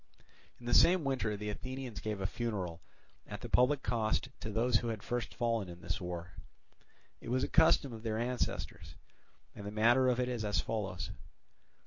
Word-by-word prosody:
In 120 - -13
the 120 - -1
same 180 -1 +6
winter 125 -6 0
the 105 +1 -3
Athenians 130 0 -6
gave 105 -2 -3
a 95 - -2
funeral 95 -7 -3 0.5
at 105 0 -7
the 120 - -6
public 130 +4 +4
cost 110 +3 0
to 110 - -5
those 115 +2 +3
who 120 - -3
had 110 -3 -3
first 120 -1 -3
fallen 115 -5 0
in 85 0 -10
this 110 - -3
war. 90 -1 -5 0.9
It - - -8
was 130 +2 +1
a - - +1
custom 160 -5 +4
of 110 - -8
their 110 -1 -2
ancestors, 125 +2 -2 0.6
and 100 - -9
the 100 - -4
manner 120 +5 +4
of 125 -1 +2
it 125 - +1
is 120 -3 -2
as 105 -1 +1
follows. 100 -5 -3
115 Hz, 185 wpm, -33 LUFS, 105-125 Hz, 0.9 s, same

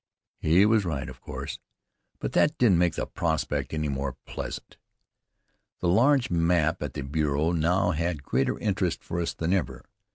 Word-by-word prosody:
He 85 +6 +4
was 110 -1 +3
right, 75 -7 -3
of - - -10
course, - - -6 0.6
but - - -4
that 150 - +2
didn't 100 -9 +4
make 90 -2 +2
the - - -2
prospect - - -2
any 75 -1 -1
the 70 - -2
more 65 -1 -3
pleasant. - - -7 1.0
The 90 - 0
large 125 +6 +4
map 85 0 +2
at 75 -4 -4
the 70 - -3
bureau 75 +2 0
now 90 +3 +2
had 85 -2 -2
greater 65 -1 0
interest - - -1
for 85 - -3
us 85 - -2
than 85 +3 0
ever. 65 -9 -2
85 Hz, 170 wpm, -27 LUFS, 75-90 Hz, 1.0 s, He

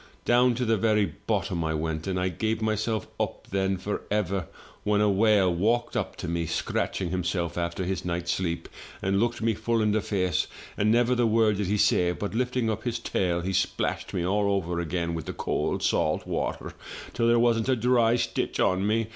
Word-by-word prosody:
Down 120 0 +4
to 125 +1 -1
the 115 -1 +2
very 105 -5 +2
bottom 85 -3 0
I 80 0 -1
went, 80 +2 -3
and 95 -1 -1
I 90 0 +1
gave 110 +5 -1
myself 110 0 -1
up, - - -3
then, 95 0 +1
for 105 +3 -3
ever, 100 -4 -1 0.4
when 105 0 +2
a 105 -1 +4
whale 100 -2 +4
walked 115 +7 +1
up - - -2
to - - -6
me, 85 -1 -1
scratching 90 +3 -2
himself 90 -2 -1
after 85 +1 -2
his 90 -1 -2
night's 85 -1 -2
sleep, 85 -3 -2 0.4
and 95 +1 +1
looked 120 0 0
me 115 0 +2
full 115 +2 0
in 105 -1 +2
the 110 0 +1
face, 90 -5 0 0.3
and 105 +1 +2
never 120 +2 +3
the 120 -2 +2
word 110 -2 +3
did 100 -2 -1
he 105 +2 +1
say, 90 -3 +3
but, 100 +3 -4
lifting 125 0 0
up 110 0 -1
his 120 -1 -1
tail, 90 -6 -1
he 95 +2 -2
splashed 95 - -1
me 85 - -1
all 100 +2 +1
over 90 -3 -1
again 85 0 -2
with 80 -3 -5
the - - -3
cold - - -1
salt 75 - +1
water - - -3 0.4
till 115 -1 +1
there 120 0 +5
wasn't 115 0 +2
a 130 - +4
dry 120 -1 +3
stitch 120 - -1
on 95 +2 +2
me! 110 +1 +1
100 Hz, 205 wpm, -27 LUFS, 90-115 Hz, 0.4 s, there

